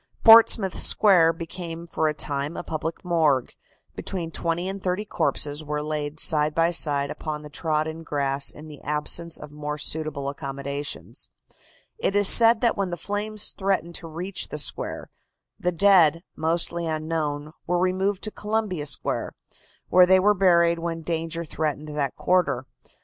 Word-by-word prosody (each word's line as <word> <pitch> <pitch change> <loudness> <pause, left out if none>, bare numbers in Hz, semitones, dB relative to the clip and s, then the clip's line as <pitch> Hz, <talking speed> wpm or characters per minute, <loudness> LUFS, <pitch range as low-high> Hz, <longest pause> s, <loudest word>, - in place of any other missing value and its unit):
Portsmouth 225 -4 +7
Square 175 -6 +5
became 165 0 -7
for 160 -2 -1
a 155 - 0
time 145 +1 -3
a - - -4
public 160 +2 -5
morgue. 155 -7 +1 0.4
Between 170 -4 -4
twenty 170 +2 -2
and 195 0 -5
thirty 185 +3 -2
corpses 155 -4 -1
were 150 0 -3
laid 150 0 -4
side 150 -1 +3
by 165 +1 +3
side 145 -4 +1
upon 150 -1 -5
the 150 - -11
trodden 155 +1 -2
grass 140 -3 0
in 150 +1 -9
the 150 -2 -12
absence 150 +3 -1
of 145 - -11
more 150 0 -5
suitable 150 -2 -2
accommodations. 140 +1 -5 0.7
It 200 - 0
is 205 -1 +4
said 230 +1 +5
that 235 - +2
when 195 -2 -2
the 175 - -4
flames 210 +2 -3
threatened 190 -3 -1
to 165 - -5
reach 175 +4 -4
the - - -6
square, 150 - -2 0.5
the 180 - 0
dead, 170 -3 +4
mostly 170 +1 -1
unknown, 155 -2 -3 0.2
were 175 +1 +1
removed 185 +2 0
to 215 - -1
Columbia 210 -9 -2
Square, 135 - -2 0.6
where 180 0 +6
they 190 0 +6
were 205 +3 +4
buried 170 -3 +3
when 165 -1 -4
danger 165 +1 -3
threatened 155 -1 -3
that 145 -3 -2
quarter. 180 -8 +1
165 Hz, 155 wpm, -24 LUFS, 150-185 Hz, 0.7 s, Portsmouth